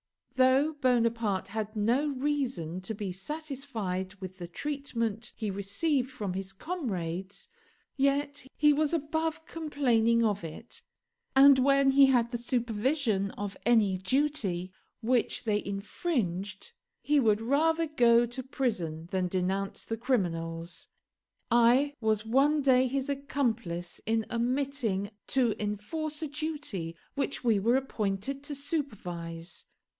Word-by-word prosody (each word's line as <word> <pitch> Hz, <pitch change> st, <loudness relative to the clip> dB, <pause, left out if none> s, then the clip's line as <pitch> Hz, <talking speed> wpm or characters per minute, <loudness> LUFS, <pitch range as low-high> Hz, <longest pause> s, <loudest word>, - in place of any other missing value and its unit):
Though 265 Hz, +4 st, +4 dB
Bonaparte 235 Hz, -7 st, +1 dB
had 215 Hz, +1 st, -4 dB
no 235 Hz, +8 st, +2 dB
reason 255 Hz, -, -2 dB
to 220 Hz, +4 st, -4 dB
be 200 Hz, -2 st, -4 dB
satisfied 220 Hz, -, -4 dB
with 185 Hz, -1 st, -8 dB
the 175 Hz, -2 st, -6 dB
treatment 235 Hz, -, -3 dB
he 215 Hz, -2 st, -3 dB
received 245 Hz, -, 0 dB
from 205 Hz, -7 st, -4 dB
his 190 Hz, 0 st, -4 dB
comrades, 195 Hz, -, -4 dB, 0.5 s
yet 280 Hz, 0 st, 0 dB
he 295 Hz, 0 st, +5 dB
was 305 Hz, +2 st, +1 dB
above 320 Hz, +1 st, -2 dB
complaining 245 Hz, -8 st, +2 dB
of 205 Hz, -4 st, 0 dB
it; 165 Hz, +9 st, -9 dB, 0.5 s
and 275 Hz, 0 st, +8 dB
when 275 Hz, +1 st, +4 dB
he 275 Hz, 0 st, +7 dB
had 245 Hz, -3 st, +3 dB
the 240 Hz, -, -2 dB
supervision 235 Hz, -2 st, 0 dB
of 205 Hz, -1 st, -5 dB
any 215 Hz, -6 st, +3 dB
duty 195 Hz, -6 st, 0 dB, 0.3 s
which 245 Hz, +1 st, +1 dB
they 210 Hz, -3 st, 0 dB
infringed, 200 Hz, -, -3 dB, 0.3 s
he 295 Hz, 0 st, +3 dB
would 215 Hz, -5 st, +3 dB
rather 320 Hz, +8 st, +2 dB
go 240 Hz, -6 st, +4 dB
to 240 Hz, +2 st, -5 dB
prison 185 Hz, -, -2 dB
than 185 Hz, -1 st, 0 dB
denounce 190 Hz, +2 st, -2 dB
the 225 Hz, -, -3 dB
criminals. 170 Hz, -8 st, -2 dB, 0.6 s
I 240 Hz, +5 st, +5 dB
was 215 Hz, -1 st, +1 dB
one 280 Hz, +6 st, +3 dB
day 260 Hz, -1 st, +5 dB
his 270 Hz, +2 st, -2 dB
accomplice 240 Hz, -11 st, -2 dB
in 225 Hz, 0 st, +1 dB
omitting 240 Hz, -4 st, -1 dB, 0.2 s
to 245 Hz, -5 st, +2 dB
enforce 295 Hz, +10 st, -3 dB
a -, -, -1 dB
duty 295 Hz, -, -4 dB, 0.2 s
which 280 Hz, -1 st, -2 dB
we 225 Hz, -4 st, +3 dB
were 230 Hz, +5 st, +3 dB
appointed 255 Hz, 0 st, -2 dB
to 290 Hz, -1 st, -3 dB
supervise. 185 Hz, -, -4 dB
235 Hz, 125 wpm, -29 LUFS, 195-280 Hz, 0.6 s, and